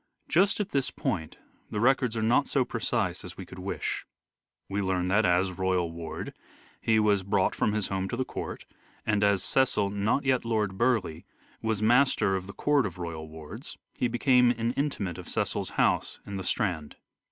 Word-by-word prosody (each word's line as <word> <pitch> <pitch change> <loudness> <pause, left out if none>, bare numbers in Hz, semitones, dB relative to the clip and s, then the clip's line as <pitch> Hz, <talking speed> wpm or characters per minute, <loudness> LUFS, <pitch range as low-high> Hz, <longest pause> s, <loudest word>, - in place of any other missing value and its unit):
Just 195 +6 +3
at 205 -1 -1
this 135 -5 +1
point 80 -4 -3 0.3
the 105 - -3
records 125 -1 +2
are 110 - 0
not 120 +5 +3
so 135 -3 +2
precise 110 -6 -1
as 90 0 -9
we 95 - -7
could 90 - -11
wish. 95 +2 -3 0.6
We 100 +1 -1
learn 90 -2 0
that, 100 +1 +3
as 90 +2 +2
royal 90 -2 0
ward, 85 -1 -6 0.5
he 110 -1 +3
was 105 -2 +3
brought 95 0 +1
from 105 - +1
his 105 -2 -1
home 95 0 -2
to 120 - -3
the 130 - 0
court, - - -6 0.4
and 105 -1 +2
as 100 -2 +3
Cecil 125 -7 +2
(not 105 +7 0
yet 130 -2 +2
Lord 110 -4 0
Burleigh) 110 -8 +1 0.4
was 110 -2 -1
master 120 -4 +4
of 95 0 -4
the 100 - -8
court 145 -5 +2
of 90 - -9
royal 80 -3 -5
wards, 80 -1 -9 0.2
he 125 - +1
became 125 +1 +4
an 115 -1 0
inmate 125 - -2
of - - -9
Cecil's - - -1
house - - +2
in 100 -1 -5
the 95 - -4
Strand. 90 -7 -1
105 Hz, 185 wpm, -28 LUFS, 95-120 Hz, 0.6 s, master